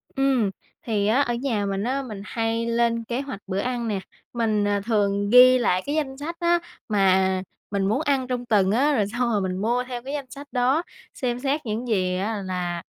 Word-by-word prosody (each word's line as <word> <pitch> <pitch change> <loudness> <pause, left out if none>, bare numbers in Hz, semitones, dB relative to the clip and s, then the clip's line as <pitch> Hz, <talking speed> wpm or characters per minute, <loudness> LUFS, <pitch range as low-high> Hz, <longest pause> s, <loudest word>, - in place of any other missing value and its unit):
Ừm, 270 -6 +2 0.3
thì 210 -3 0
á, 235 +6 +3
ở 240 -4 0
nhà 235 -4 -1
mình 195 0 -2
á, 265 +4 -1
mình 215 -6 -7
hay 225 +1 -1
lên 230 0 +1
kế 240 +3 -3
hoạch 275 -7 -6
bữa 190 0 -2
ăn 240 +1 -2
nè. 205 -3 -1 0.3
Mình, 215 -3 +1
à, 205 0 +1
thường 205 -2 +1
ghi 250 +2 +8
lại 185 -7 +1
cái 290 - -2
danh 275 -4 -2
sách 320 +4 -5
á, 345 0 +3 0.3
mà 190 -2 +3 0.3
mình 195 -1 0
muốn 220 +8 +1
ăn 275 -4 0
trong 250 -1 -3
tuần 200 -5 +3
á, 275 +7 +3
rồi 210 -5 +2
xong 240 +3 -1
rồi 210 -3 +1
mình 185 -1 -2
mua 240 +4 +1
theo 245 -2 -5
cái 275 - -5
danh 280 -3 -4
sách 280 +3 -10
đó, 260 +6 +2 0.3
xem 245 -2 -2
xét 280 +3 -1
những 225 +3 -3
gì 185 -5 +1
á 205 +2 -2
là, 180 -2 -3
230 Hz, 220 wpm, -24 LUFS, 205-260 Hz, 0.3 s, ghi